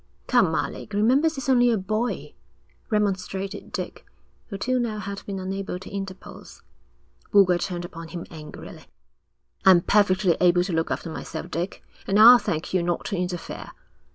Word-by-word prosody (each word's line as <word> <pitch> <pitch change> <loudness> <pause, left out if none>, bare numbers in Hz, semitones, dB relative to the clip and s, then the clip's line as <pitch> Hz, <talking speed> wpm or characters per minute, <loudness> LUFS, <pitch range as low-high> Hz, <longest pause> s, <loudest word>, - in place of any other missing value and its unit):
'Come, - - +3
Alec, 215 - -4
remember 250 +10 +3
he's 275 -5 -6
only 245 -2 +4
a 230 - +2
boy,' 215 +5 -2 0.6
remonstrated 195 -2 -2
Dick, - - -5 0.4
who 200 - -6
till 255 +5 0
now 230 -3 -2
had 200 0 -6
been 200 -1 -4
unable 190 0 -4
to 185 - -11
interpose. 195 -1 -8 0.7
Boulger 185 -3 +5
turned 175 -1 -3
upon 165 -1 -9
him 170 0 -7
angrily. 155 -2 -10 0.8
'I'm 185 -2 +7
perfectly 190 -3 +3
able 175 0 +4
to 180 -1 -4
look 160 0 0
after 165 - -3
myself, 160 0 -7
Dick, 175 +3 -4 0.2
and 195 - +2
I'll 240 +3 +10
thank 160 -4 -3
you 185 - +2
not 175 0 -2
to 200 - -2
interfere.' 180 -1 -5
195 Hz, 155 wpm, -24 LUFS, 175-210 Hz, 0.8 s, I'll